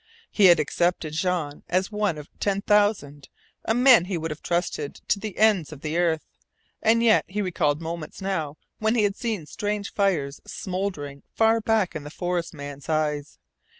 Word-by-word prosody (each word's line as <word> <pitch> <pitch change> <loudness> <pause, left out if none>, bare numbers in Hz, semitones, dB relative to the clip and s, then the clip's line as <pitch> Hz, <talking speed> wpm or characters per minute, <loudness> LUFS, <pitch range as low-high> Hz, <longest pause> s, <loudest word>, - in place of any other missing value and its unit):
He 205 - +4
had 175 -3 +7
accepted 165 +1 0
Jean 160 -3 -1
as 185 +3 0
one 210 -6 0
of 150 0 -9
ten 200 -1 0
thousand 205 -10 +1 0.4
a 225 - +1
man 250 -6 +6
he 185 -1 -2
would 165 0 -4
have 150 - -7
trusted 170 -4 -2
to 200 - +2
the 210 -2 -6
ends 210 -8 +3
of 145 -3 -10
the 155 +1 -3
earth, 170 -2 +1 0.6
and 230 +1 +3
yet 225 -2 +5
he 200 +3 -4
recalled 165 -6 0
moments 165 -1 -6
now 160 -7 -3 0.2
when 220 +2 +1
he 220 - +3
had 200 -1 +1
seen 220 -9 -3
strange 205 +4 -3
fires 165 -9 0
smouldering 180 -8 -4
far 225 0 +3
back 220 -4 +1
in 155 - -4
the 145 - -8
forest 175 +1 -2
man's 145 -2 -9
eyes. 150 -2 -1
180 Hz, 180 wpm, -25 LUFS, 155-205 Hz, 0.6 s, had